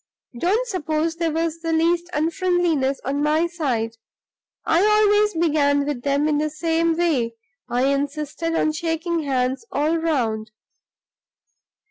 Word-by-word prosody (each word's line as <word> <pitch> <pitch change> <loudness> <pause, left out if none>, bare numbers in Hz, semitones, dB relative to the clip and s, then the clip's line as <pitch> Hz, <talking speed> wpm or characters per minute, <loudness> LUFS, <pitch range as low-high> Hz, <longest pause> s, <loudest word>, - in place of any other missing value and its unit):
Don't 430 - +1
suppose 325 -4 -1
there 335 -1 0
was 325 +1 -1
the 330 0 -3
least 340 +2 +1
unfriendliness 325 -4 0
on 280 +2 -1
my 305 +3 +2
side; 250 -10 -2 0.7
I 335 +4 +3
always 420 -1 +4
began 290 -3 +2
with 285 -4 -3
them 280 +2 +1
in 295 -1 +1
the 305 0 0
same 325 +1 0
way 265 -10 0 0.3
I 245 +1 +1
insisted 290 +4 -1
on 310 - +2
shaking 335 +1 -2
hands 260 - -1
all 305 +3 +1
round. 230 -9 -1
315 Hz, 130 wpm, -22 LUFS, 285-335 Hz, 0.7 s, always